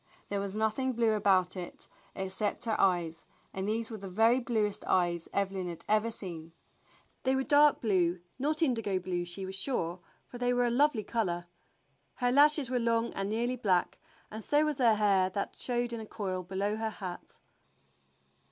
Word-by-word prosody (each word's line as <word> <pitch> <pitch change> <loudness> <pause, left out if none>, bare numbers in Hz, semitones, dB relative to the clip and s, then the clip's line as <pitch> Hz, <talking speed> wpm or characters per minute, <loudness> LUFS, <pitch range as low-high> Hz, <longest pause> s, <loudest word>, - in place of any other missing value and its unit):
There 200 - -1
was 200 0 -4
nothing 220 +5 0
blue 230 -2 +2
about 190 -3 +2
it 180 -2 -8 0.3
except 190 +4 -2
her 225 -2 0
eyes, 170 -4 +1 0.3
and 190 +1 -3
these 225 +2 -2
were 220 - -5
the 195 0 -7
very 225 +6 +4
bluest 220 -4 -1
eyes 175 -2 +1
Evelyn 195 -2 -1
had 170 - -8
ever 215 +2 +2
seen. 170 -7 -6 0.7
They 260 0 +1
were 265 - +1
dark 295 +1 +5
blue, 180 -5 +2 0.2
not 305 +4 0
indigo 225 -9 +1
blue 180 -1 -2
she 175 +2 -6
was 190 - -6
sure, 190 -5 -2 0.3
for 245 - -10
they 245 0 +1
were 245 0 +2
a 240 - +1
lovely 260 -3 +2
color. 175 -7 -1 0.7
Her 245 -1 +1
lashes 290 +1 +5
were 250 0 0
long 230 0 +1
and 195 0 -2
nearly 240 +4 -1
black, 185 -6 +1 0.3
and 220 +1 -7
so 295 +6 +3
was 300 -3 -2
her 230 -4 +5
hair 200 -3 +3
that 200 +1 -4
showed 240 -1 -2
in 230 - -3
a 220 - -8
coil 190 -4 -3
below 195 +4 -2
her 220 0 -1
hat. 185 -5 -8
215 Hz, 180 wpm, -31 LUFS, 185-240 Hz, 0.7 s, dark